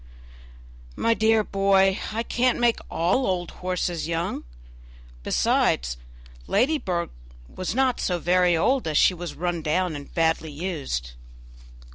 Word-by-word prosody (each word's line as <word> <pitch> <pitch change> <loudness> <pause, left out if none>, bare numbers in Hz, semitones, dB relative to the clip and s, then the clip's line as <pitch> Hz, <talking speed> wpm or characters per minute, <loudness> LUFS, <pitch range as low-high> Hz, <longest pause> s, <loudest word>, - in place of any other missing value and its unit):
"My 230 - +2
dear 220 -1 +3
boy, 195 0 +2
I 225 +2 -2
can't 250 +1 +1
make 240 -1 +2
all 180 +11 +1
old 180 -2 -2
horses 180 -3 -2
young; 165 - -3 0.8
besides, - - +1 0.5
Ladybird 215 - 0 0.4
was 185 +4 -5
not 260 -2 +2
so 180 - 0
very 175 0 +3
old, 255 +6 +1
as 155 -2 0
she - - +5
was 175 -1 -7
run 175 0 -2
down 165 +2 0
and 145 -1 -9
badly 160 -2 0
used." 145 - -4
180 Hz, 125 wpm, -24 LUFS, 165-215 Hz, 0.8 s, she